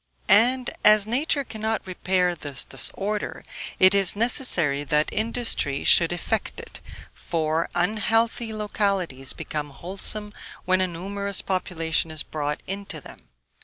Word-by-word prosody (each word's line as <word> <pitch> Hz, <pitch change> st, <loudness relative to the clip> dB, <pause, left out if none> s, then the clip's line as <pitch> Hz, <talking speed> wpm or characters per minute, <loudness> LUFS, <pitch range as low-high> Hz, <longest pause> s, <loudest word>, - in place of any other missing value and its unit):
And, 245 Hz, +5 st, +4 dB
as 210 Hz, -1 st, +7 dB
nature 280 Hz, +5 st, 0 dB
cannot 220 Hz, -2 st, -3 dB
repair 185 Hz, -1 st, 0 dB
this 145 Hz, -5 st, -4 dB
disorder, 205 Hz, +1 st, -2 dB, 0.3 s
it 185 Hz, +1 st, +6 dB
is 195 Hz, -2 st, +4 dB
necessary 195 Hz, -, +2 dB
that 150 Hz, +1 st, +1 dB
industry 220 Hz, -, 0 dB
should 170 Hz, -1 st, +5 dB
effect 175 Hz, -2 st, -2 dB
it, -, -, -10 dB, 0.3 s
for 160 Hz, 0 st, -2 dB
unhealthy 225 Hz, +3 st, +1 dB
localities 200 Hz, -10 st, -1 dB
become 150 Hz, -1 st, -5 dB
wholesome 195 Hz, +7 st, -4 dB, 0.3 s
when 185 Hz, 0 st, +2 dB
a 185 Hz, -, +2 dB
numerous 200 Hz, +3 st, -3 dB
population 165 Hz, -4 st, -1 dB
is 155 Hz, -1 st, -1 dB
brought 150 Hz, -1 st, -4 dB
into 195 Hz, -4 st, -5 dB
them. 95 Hz, -, -14 dB
190 Hz, 125 wpm, -24 LUFS, 160-215 Hz, 0.3 s, as